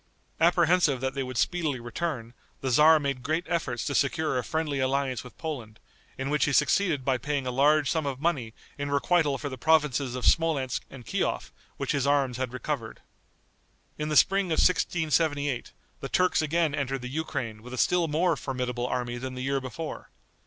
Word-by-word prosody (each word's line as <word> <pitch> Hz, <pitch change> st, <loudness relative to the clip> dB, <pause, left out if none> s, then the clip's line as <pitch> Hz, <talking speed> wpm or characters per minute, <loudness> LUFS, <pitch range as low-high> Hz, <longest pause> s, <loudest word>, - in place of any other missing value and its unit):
Apprehensive 170 Hz, -4 st, +4 dB
that 130 Hz, 0 st, -1 dB
they 135 Hz, -, -2 dB
would 130 Hz, -2 st, -5 dB
speedily 155 Hz, -3 st, 0 dB
return, 120 Hz, -1 st, -4 dB, 0.3 s
the 135 Hz, -, -1 dB
tzar 155 Hz, +5 st, +6 dB
made 140 Hz, -3 st, -2 dB
great 155 Hz, +7 st, -1 dB
efforts 165 Hz, -9 st, -2 dB
to 140 Hz, -, -2 dB
secure 150 Hz, +2 st, +1 dB
a -, -, -3 dB
friendly 155 Hz, -3 st, -2 dB
alliance 130 Hz, -2 st, 0 dB
with 125 Hz, -, -13 dB
Poland, 125 Hz, -9 st, -6 dB, 0.4 s
in 135 Hz, +1 st, -3 dB
which 150 Hz, -, +2 dB
he 150 Hz, -, 0 dB
succeeded 155 Hz, -4 st, +2 dB
by 130 Hz, -2 st, +1 dB
paying 140 Hz, +1 st, -2 dB
a 125 Hz, -, -1 dB
large 145 Hz, +3 st, +3 dB
sum 160 Hz, -3 st, 0 dB
of 135 Hz, -2 st, -3 dB
money 140 Hz, -8 st, -1 dB, 0.3 s
in 145 Hz, 0 st, -2 dB
requital 140 Hz, +1 st, +2 dB
for 145 Hz, -, -5 dB
the 130 Hz, -3 st, -7 dB
provinces 145 Hz, -4 st, +2 dB
of 125 Hz, -, -3 dB
Smolensk 150 Hz, -6 st, +2 dB
and 125 Hz, -4 st, -11 dB
Kiof 90 Hz, -, -2 dB, 0.3 s
which -, -, -2 dB
his 140 Hz, -2 st, 0 dB
arms 140 Hz, -4 st, +2 dB
had 130 Hz, -2 st, -2 dB
recovered. 125 Hz, -3 st, -4 dB, 1.0 s
In 150 Hz, 0 st, -2 dB
the 150 Hz, -, +2 dB
spring 195 Hz, 0 st, +4 dB
of 160 Hz, -, -1 dB
1678, 155 Hz, -6 st, +1 dB, 0.3 s
the 135 Hz, -, -6 dB
Turks 185 Hz, -2 st, +2 dB
again 160 Hz, 0 st, +1 dB
entered 135 Hz, -3 st, -2 dB
the -, -, -4 dB
Ukraine 125 Hz, -6 st, -4 dB
with 125 Hz, +2 st, -11 dB
a -, -, -9 dB
still 175 Hz, +5 st, +2 dB
more 165 Hz, +3 st, +2 dB
formidable 125 Hz, -3 st, -3 dB
army 120 Hz, -1 st, -2 dB
than 130 Hz, +1 st, -5 dB
the 125 Hz, -, -5 dB
year 135 Hz, 0 st, 0 dB
before. 150 Hz, +5 st, -6 dB
140 Hz, 190 wpm, -27 LUFS, 125-160 Hz, 1.0 s, tzar